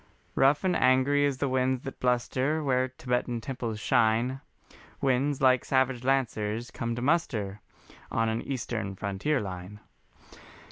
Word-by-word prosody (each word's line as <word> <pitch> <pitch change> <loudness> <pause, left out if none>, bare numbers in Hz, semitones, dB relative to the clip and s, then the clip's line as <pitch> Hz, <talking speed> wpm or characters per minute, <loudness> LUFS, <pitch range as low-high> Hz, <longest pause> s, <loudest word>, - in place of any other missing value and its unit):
Rough 135 +4 +3
and 185 -2 +2
angry 130 +3 +3
as 140 -2 -2
the 140 - 0
winds 130 0 0
that 135 - -7
bluster 130 +5 0
Where 130 -2 +2
Tibetan 125 -2 -2
temples 115 -3 -4
shine, 115 +5 +2 0.6
Winds 135 +2 +1
like 130 -1 +4
savage 130 -2 +1
lancers 120 -4 0
come 115 -1 -3
to 120 - -4
muster 115 - 0 0.5
On 115 0 +1
an 110 +1 -1
Eastern 110 -6 -4
frontier 100 +10 -1
line. 95 0 -7
130 Hz, 135 wpm, -28 LUFS, 115-135 Hz, 0.6 s, like